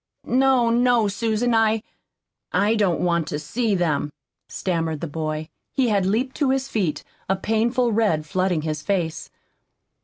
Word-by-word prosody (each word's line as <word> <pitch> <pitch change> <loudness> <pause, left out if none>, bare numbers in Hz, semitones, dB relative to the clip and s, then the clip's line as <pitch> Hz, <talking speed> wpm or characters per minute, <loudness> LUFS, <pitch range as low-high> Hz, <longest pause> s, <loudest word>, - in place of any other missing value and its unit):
"No, 255 -2 +3
no, 240 -2 +3
Susan, 225 +3 0
I 225 -1 +2 0.7
I 205 +2 +2
don't 205 -6 +1
want 170 -3 +1
to 150 - -3
see 210 +8 -1
them," 150 -5 0 0.4
stammered 165 -4 -2
the - - -3
boy. 155 0 -4 0.3
He 260 -4 +2
had 200 -3 +2
leaped 245 +7 0
to 285 -3 +1
his 265 0 0
feet, 190 - -1 0.3
a 190 - +3
painful 230 +5 +1
red 205 -9 +1
flooding 185 -1 0
his 155 -2 -3
face. 165 -1 -2
205 Hz, 150 wpm, -23 LUFS, 165-235 Hz, 0.7 s, No